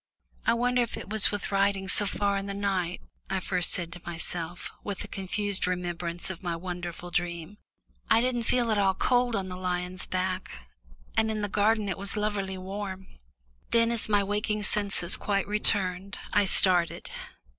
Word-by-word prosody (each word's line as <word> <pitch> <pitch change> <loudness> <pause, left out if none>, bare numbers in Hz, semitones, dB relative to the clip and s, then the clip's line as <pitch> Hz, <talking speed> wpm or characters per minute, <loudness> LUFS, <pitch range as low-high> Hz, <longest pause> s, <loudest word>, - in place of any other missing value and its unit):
"I - - +5
wonder 245 +1 +2
if 235 - -2
it - - -8
was 215 -1 +4
with 205 -1 -4
riding 195 -1 +2
so 205 +1 +5
far 200 0 0
in 195 0 -2
the 200 - -4
night," 190 -3 -1 0.3
I 190 - 0
first 180 -1 0
said 170 -2 +3
to 175 - -10
myself, 175 0 -2
with 205 -2 -4
a - - -8
confused 200 0 -1
remembrance 175 -1 -2
of 180 - -9
my 175 -3 -2
wonderful 175 0 -6
dream. 175 +2 -2 0.5
"I 225 - +6
didn't 245 0 +1
feel 240 -2 +2
at 210 - +2
all 190 -1 +3
cold 245 +1 +2
on 190 -1 -1
the 180 - -5
lion's 180 0 -3
back, 185 - -3 0.5
and 220 0 +3
in 215 -1 -2
the - - +1
garden 210 +1 +2
it 190 0 -3
was 200 +1 -2
lovelily 200 -2 -1
warm." 190 0 -6 0.6
Then, 230 0 +3
as 230 -2 +1
my 205 -1 +4
waking 210 +1 -1
senses 200 -3 +3
quite 200 -1 0
returned, 195 -2 +1 0.2
I 205 - +4
started. 180 -2 +3
195 Hz, 175 wpm, -28 LUFS, 180-210 Hz, 0.6 s, I